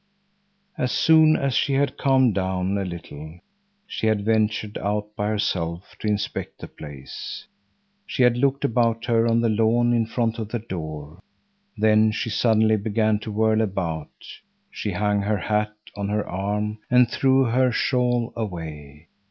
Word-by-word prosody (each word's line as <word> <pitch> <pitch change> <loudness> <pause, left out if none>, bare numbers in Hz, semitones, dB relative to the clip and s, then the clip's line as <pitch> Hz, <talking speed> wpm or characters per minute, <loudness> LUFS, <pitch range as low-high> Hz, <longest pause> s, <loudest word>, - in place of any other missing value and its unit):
As 125 - 0
soon 160 -1 +5
as 140 -2 -1
she 140 - +1
had 140 -1 +1
calmed 130 -4 +3
down 95 0 -1
a 100 - -1
little 80 -3 -8 0.5
she 110 - -3
had 105 -2 +1
ventured 110 -1 0
out 105 +1 -3
by 105 - -1
herself 90 -4 -2
to - - -4
inspect 105 -1 -2
the - - -9
place. 70 -3 -9 0.6
She 130 - 0
had 125 -1 +4
looked 140 +2 +1
about 115 -2 +1
her 115 -1 +2
on 115 0 +2
the 115 - +2
lawn 115 +2 +2
in 115 -2 +1
front 115 0 -1
of 110 -2 -4
the 120 - -2
door. 80 -7 -7 0.6
Then 110 0 +4
she 110 +1 -3
suddenly 110 0 +3
began 110 0 +1
to 110 - -6
whirl 110 +1 +2
about; 90 -7 -2 0.6
she - - -4
hung 105 -1 +1
her 105 +1 0
hat 105 +3 -1 0.2
on 100 0 -3
her 105 0 -1
arm 105 +3 -2
and 125 0 +5
threw 135 +2 +3
her 125 +1 +2
shawl 120 -1 0
away. 80 -7 -7
110 Hz, 160 wpm, -23 LUFS, 100-115 Hz, 0.6 s, soon